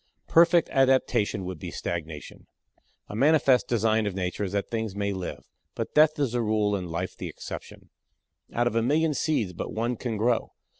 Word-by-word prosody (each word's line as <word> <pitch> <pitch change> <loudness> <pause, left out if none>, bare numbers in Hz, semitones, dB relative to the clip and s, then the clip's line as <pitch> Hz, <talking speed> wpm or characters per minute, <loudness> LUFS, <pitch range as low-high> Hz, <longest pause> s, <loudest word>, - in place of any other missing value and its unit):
Perfect 170 0 +5
adaptation 125 -7 +2
would 90 -3 -6
be - - -6
stagnation. 80 -3 -6 0.6
A - - -7
manifest 135 -2 +4
design 110 -2 +2
of 100 - -3
Nature 90 +1 -2
is 95 - -5
that 100 -1 -1
things 110 -3 -3
may 100 0 -1
live. 95 -2 -6 0.3
But - - -4
death 155 0 +5
is 140 -5 0
the 120 0 0
rule 105 -2 +1
and 90 -3 -4
life 85 +3 -3
the - - -6
exception. - - -9 0.6
Out 120 - +1
of 120 - 0
a 115 - +3
million 150 +6 +2
seeds 130 - 0
but 85 - -5
one 120 +3 -1
can 115 -2 -3
grow. 115 +2 0
110 Hz, 185 wpm, -26 LUFS, 100-130 Hz, 0.6 s, Perfect